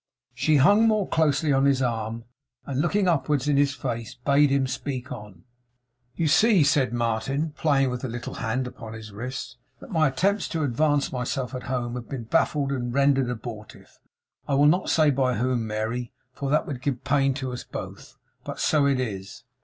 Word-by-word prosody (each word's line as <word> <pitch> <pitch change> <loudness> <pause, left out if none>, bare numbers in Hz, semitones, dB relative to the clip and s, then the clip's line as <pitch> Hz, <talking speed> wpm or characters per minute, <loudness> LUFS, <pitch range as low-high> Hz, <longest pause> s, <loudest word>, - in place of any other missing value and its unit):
She 140 +6 +2
hung 205 +11 +5
more 215 -3 +2
closely 155 -1 +2
on 135 +1 +3
his 140 -2 +3
arm, 115 -2 -2 0.4
and 140 0 -1
looking 190 +4 +1
upwards 145 -4 +1
in 145 - +3
his 145 0 +2
face, 115 -5 -4
bade 140 +3 +3
him 135 -1 +2
speak 130 0 -4
on. 105 -7 -9 0.7
'You 165 - 0
see,' 205 +3 +5
said 140 -5 +2
Martin, 120 +6 -1
playing 140 -3 +1
with 125 0 -4
the 130 - -3
little 120 0 -6
hand 125 +4 -2
upon 115 -3 -8
his 110 -1 -9
wrist, 125 +4 -6 0.2
'that - - -12
my 160 -4 +3
attempts 195 +9 0
to 160 -2 -2
advance 145 +2 +1
myself 125 +1 -3
at 130 - -4
home 120 -2 -2
have 125 -1 -7
been 135 -4 -5
baffled 140 +2 +1
and 120 -3 -2
rendered 135 -1 +2
abortive. 110 -3 -8 0.5
I 140 - +1
will 145 +1 +4
not 175 +5 +3
say 155 -2 +4
by 130 -2 +1
whom, 120 0 0
Mary, 110 +3 -3 0.2
for 140 +1 -4
that 150 +2 +2
would 130 -5 -6
give 130 -2 -2
pain 140 -2 +2
to 130 -2 -4
us 125 - -6
both. - - -9 0.3
But - - -7
so 145 -2 +3
it 135 -2 +1
is. 105 -1 -5
135 Hz, 190 wpm, -25 LUFS, 120-145 Hz, 0.7 s, hung